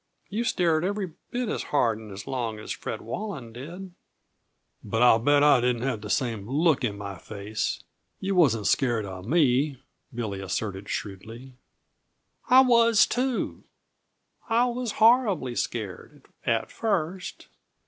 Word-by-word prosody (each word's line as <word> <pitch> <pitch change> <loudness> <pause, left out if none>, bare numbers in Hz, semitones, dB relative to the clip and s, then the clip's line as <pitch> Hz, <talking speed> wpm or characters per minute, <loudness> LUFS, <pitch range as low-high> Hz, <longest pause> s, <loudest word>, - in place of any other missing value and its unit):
You 215 +4 -1
stared 165 -6 +2
every 195 -1 -2 0.2
bit 245 0 -2
as - - -2
hard 115 -7 +1
and 105 -2 -9
long 120 -5 -3
as 105 - -7
Fred - - -5
Walland 160 - -6
did." 175 +10 -8 0.9
"But 110 +3 0
I'll 120 -2 +6
bet 145 +4 +4
I 145 -4 +6
didn't 125 -1 0
have 125 -5 -1
the 105 - -7
same 115 -4 -1
look 150 0 +2
in 105 -4 -1
my 100 -2 -7
face. 105 +1 -4 0.4
Yuh 195 +1 -1
wasn't 130 - +3
scared 120 -6 +1
of 95 0 -8
me," 140 -2 +2 0.3
Billy 110 -5 -4
asserted 95 +1 -4
shrewdly. 115 +6 -6 1.0
"I 255 +1 +8
was 230 -3 +5
too! 250 0 -2 0.9
I 230 +2 +4
was 245 -2 -2
horribly 220 - +3
scared 120 +5 -5 0.2
at 115 -2 0
first. 185 -4 -2
130 Hz, 140 wpm, -26 LUFS, -, 1.0 s, I